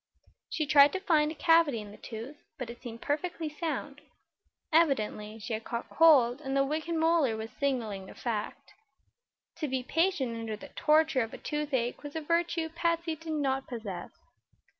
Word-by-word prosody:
She 310 Hz, -, -1 dB
tried 285 Hz, 0 st, +7 dB
to 380 Hz, -, -1 dB
find 315 Hz, -6 st, +3 dB
a -, -, -7 dB
cavity 325 Hz, -6 st, +4 dB
in 210 Hz, -1 st, -9 dB
the 210 Hz, -, -12 dB
tooth, 235 Hz, +6 st, -8 dB, 0.2 s
but 250 Hz, -3 st, -5 dB
it 235 Hz, -, -13 dB
seemed 230 Hz, -2 st, -8 dB
perfectly 315 Hz, +2 st, -2 dB
sound. 295 Hz, -2 st, -4 dB, 0.7 s
Evidently 220 Hz, -9 st, +2 dB
she 225 Hz, +1 st, -5 dB
had 220 Hz, +1 st, -3 dB
caught 235 Hz, +1 st, -5 dB
cold 280 Hz, -5 st, +5 dB
and 270 Hz, -1 st, -2 dB
the 275 Hz, -, +4 dB
wicked 315 Hz, +4 st, -2 dB
molar 320 Hz, -8 st, +3 dB
was 220 Hz, +1 st, -6 dB
signaling 225 Hz, -9 st, -2 dB
the -, -, -12 dB
fact. 220 Hz, -4 st, -4 dB, 0.8 s
To 305 Hz, -, -2 dB
be 260 Hz, -1 st, -2 dB
patient 295 Hz, -4 st, +1 dB
under 225 Hz, -2 st, -4 dB
the -, -, -11 dB
torture 305 Hz, -3 st, +3 dB
of 225 Hz, -1 st, -4 dB
a -, -, -8 dB
toothache 285 Hz, -5 st, -2 dB
was 290 Hz, 0 st, -8 dB
a 320 Hz, -, -2 dB
virtue 335 Hz, +1 st, 0 dB
Patsy 335 Hz, 0 st, -1 dB
did 320 Hz, +1 st, -6 dB
not 270 Hz, -3 st, 0 dB
possess. 210 Hz, -7 st, -6 dB
285 Hz, 175 wpm, -30 LUFS, 235-320 Hz, 0.8 s, tried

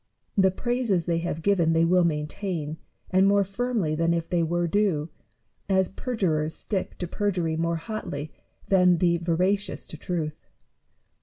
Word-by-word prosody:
The 190 Hz, -1 st, +5 dB
praises 230 Hz, -4 st, 0 dB
they 170 Hz, -1 st, +1 dB
have 165 Hz, -1 st, -3 dB
given 175 Hz, -5 st, +3 dB
they 165 Hz, 0 st, +4 dB
will 180 Hz, +1 st, +4 dB
maintain, 155 Hz, 0 st, -2 dB, 0.4 s
andmore 195 Hz, +1 st, +4 dB
firmly 205 Hz, -5 st, -1 dB
than 165 Hz, +2 st, +2 dB
if 165 Hz, -1 st, -2 dB
they 175 Hz, -1 st, +1 dB
were 175 Hz, +1 st, 0 dB
due; 170 Hz, -4 st, +1 dB, 0.6 s
as 190 Hz, -1 st, +3 dB
per 250 Hz, +5 st, -5 dB
jurers 160 Hz, -6 st, 0 dB
stick 195 Hz, -4 st, -3 dB
to 180 Hz, -, -4 dB
perjury 175 Hz, -4 st, -1 dB
more 170 Hz, +1 st, 0 dB
hotly 160 Hz, -4 st, -5 dB, 0.4 s
than 180 Hz, -2 st, +5 dB
the 170 Hz, 0 st, +2 dB
veracious 180 Hz, +4 st, 0 dB
to 155 Hz, -, -10 dB
truth. 155 Hz, -2 st, -4 dB
175 Hz, 150 wpm, -26 LUFS, 165-195 Hz, 0.6 s, The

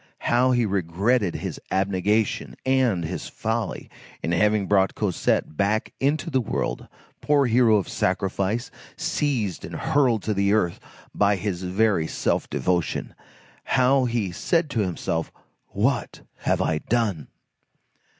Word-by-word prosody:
How 125 Hz, +2 st, +3 dB
he 120 Hz, -2 st, +3 dB
regretted 100 Hz, +2 st, 0 dB
his -, -, -5 dB
abnegation 100 Hz, +3 st, 0 dB
and 130 Hz, -10 st, +2 dB
his 80 Hz, -, -5 dB
folly 110 Hz, -1 st, -3 dB, 0.4 s
in 80 Hz, -, -1 dB
having 105 Hz, +3 st, +2 dB
brought 95 Hz, -1 st, +2 dB
Cosette 95 Hz, -5 st, 0 dB
back 105 Hz, +5 st, 0 dB
into 155 Hz, +5 st, 0 dB
the 130 Hz, -2 st, +2 dB
world, 60 Hz, -, -3 dB, 0.3 s
poor 145 Hz, -2 st, +3 dB
hero 120 Hz, -2 st, +4 dB
of 100 Hz, -4 st, +1 dB
sacrifice, 100 Hz, +5 st, -1 dB, 0.3 s
seized 120 Hz, -, -1 dB
and -, -, -7 dB
hurled 125 Hz, -7 st, +2 dB
to 110 Hz, -, 0 dB
the 100 Hz, 0 st, +2 dB
earth 90 Hz, -6 st, +1 dB, 0.3 s
by 100 Hz, 0 st, +3 dB
his 95 Hz, -2 st, -3 dB
very 95 Hz, -2 st, +1 dB
self -, -, -1 dB
devotion! 90 Hz, -2 st, -1 dB, 0.5 s
How 130 Hz, 0 st, +3 dB
he 115 Hz, -6 st, -1 dB
said 160 Hz, -, 0 dB
to 120 Hz, -, -1 dB
himself, 85 Hz, -4 st, -2 dB, 0.4 s
"What 115 Hz, +3 st, -1 dB, 0.2 s
have -, -, 0 dB
I 80 Hz, -, 0 dB
done?" 105 Hz, -, -1 dB
105 Hz, 130 wpm, -24 LUFS, 95-120 Hz, 0.5 s, hero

